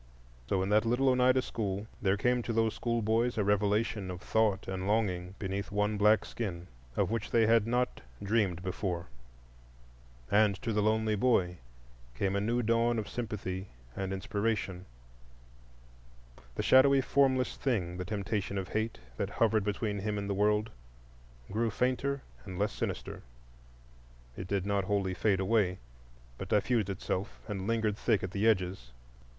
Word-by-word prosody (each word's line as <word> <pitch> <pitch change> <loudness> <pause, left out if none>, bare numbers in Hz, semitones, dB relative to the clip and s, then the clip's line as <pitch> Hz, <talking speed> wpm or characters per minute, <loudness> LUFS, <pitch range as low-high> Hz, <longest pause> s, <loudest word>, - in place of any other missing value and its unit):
So 95 -1 +1
in 95 - -2
that 105 +1 +4
little 125 +4 +2
Oneida 130 0 +4
school 100 -2 -3 0.2
there 100 0 +2
came 125 +4 +2
to 115 - -4
those 115 -1 +2
schoolboys 115 0 0
a 105 - +2
revelation 105 0 +1
of 90 -1 -5
thought 105 -1 +1
and 95 0 -3
longing 95 -4 0
beneath 100 0 -4
one 105 +1 +1
black 105 +1 +4
skin, 90 -7 -5 0.3
of - - +1
which 115 - -2
they 115 -1 +4
had 115 -1 +4
not 125 +1 0 0.2
dreamed 100 -4 +1
before. 90 - -3 1.2
And 105 -1 +4
to 115 -3 -1
the 105 - +2
lonely 110 0 +2
boy 95 -6 +2 0.6
came 95 +8 0
a 100 - +1
new 120 +4 0
dawn 115 +1 +2
of 110 - -3
sympathy 100 -5 -4 0.3
and 95 -1 -3
inspiration. 95 -1 -2 1.7
The - - -2
shadowy, 135 +1 +6
formless 130 -1 +2
thing—the 90 -8 -1
temptation 100 0 -2
of 95 -1 -3
Hate, 110 +1 -2 0.2
that - - -1
hovered 110 -2 +2
between 105 0 -2
him 105 +1 -2
and 100 -1 -3
the 100 - 0
world—grew - - -3
fainter 130 +4 0 0.2
and 95 -3 -7
less 105 +2 +1
sinister. - - -4 1.1
It 90 - -6
did 100 -1 -1
not 100 -1 0
wholly 100 -2 0
fade 95 +1 +1
away, 95 -2 +2 0.6
but - - -6
diffused 105 -1 +2
itself 95 +1 -3
and 100 -3 -4
lingered 110 -2 +1
thick 110 -4 +1
at 95 - -3
the 100 +3 +1
edges. 90 - 0
105 Hz, 150 wpm, -31 LUFS, 95-115 Hz, 1.7 s, shadowy